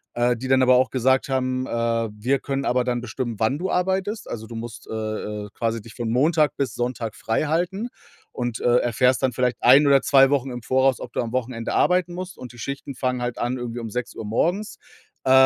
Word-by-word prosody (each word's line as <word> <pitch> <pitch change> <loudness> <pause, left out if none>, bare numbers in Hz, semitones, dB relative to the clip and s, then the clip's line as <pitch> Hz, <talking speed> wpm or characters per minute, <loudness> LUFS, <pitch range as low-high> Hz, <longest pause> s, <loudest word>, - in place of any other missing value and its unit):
äh, 120 0 +2
die 125 +3 -6
dann 130 0 +4
aber 130 0 +6
auch 130 +1 +3
gesagt 130 +2 +2
haben, 130 -1 -1
äh: 115 -1 0
„Wir 130 +6 +1
können 135 0 -3
aber 125 +1 +2
dann 120 -1 -1
bestimmen, 120 0 -4
wann 120 +6 +1
du 190 +2 -2
arbeitest.“ 190 +4 -1
Also, 110 -1 -6
du 115 - -9
musst, 115 +1 -7
äh, - - -5
äh, 105 -1 -4
quasi 115 -1 -2
dich 115 - -12
von 120 -2 -3
Montag 150 +5 +2
bis 135 -5 -1
Sonntag 120 -3 -3
freihalten 175 - -1 0.4
und, 120 -3 -3
äh, 120 0 +3
erfährst 125 +2 +2
dann 130 -2 +1
vielleicht 125 0 0
1 135 +5 +7
oder 140 -1 +5
2 135 -1 +5
Wochen 135 -2 +1
im 120 -1 -6
Voraus, 130 +1 +2
ob 120 - -8
du - - -2
am 115 -2 -4
Wochenende 120 -2 -2
arbeiten 180 -1 +2
musst. 185 0 -6
Und 125 - -8
die - - -15
Schichten 140 +2 -5
fangen 125 -1 -1
halt 120 -1 -3
an, 120 +1 -1
irgendwie 120 -1 -5
um 115 -2 -6
6:00 120 -1 -4
morgens, 175 - -1 0.5
äh, - - +4
125 Hz, 215 wpm, -23 LUFS, 115-135 Hz, 0.5 s, 1